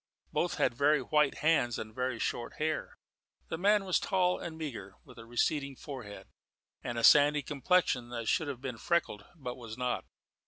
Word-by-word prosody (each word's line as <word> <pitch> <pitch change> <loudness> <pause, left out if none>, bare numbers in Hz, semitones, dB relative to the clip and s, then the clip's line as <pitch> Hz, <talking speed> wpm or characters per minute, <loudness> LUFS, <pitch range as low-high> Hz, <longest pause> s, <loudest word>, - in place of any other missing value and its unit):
Both 175 0 0
had 150 - +2
very 145 +5 +3
white 150 -2 +2
hands 145 -8 +3
and 110 0 -7
very 125 0 -2
short 120 +1 -3
hair. 155 0 -3 0.5
The - - -3
man 205 +1 +3
was 185 - +2
tall 180 -2 +1
and 160 -2 -6
meagre, 115 -11 -6
with 125 -2 -15
a 115 - -11
receding 140 +3 0
forehead 125 -8 -9 0.6
and 120 - -4
a 115 - -2
sandy 145 +1 +6
complexion 140 -4 +1
that 115 -2 -5
should 160 +4 +1
have 135 -3 -5
been 125 -4 -5
freckled, 145 -10 0
but 125 -6 -6
was 115 -2 -8
not. 125 0 -2
140 Hz, 180 wpm, -31 LUFS, 120-160 Hz, 0.6 s, sandy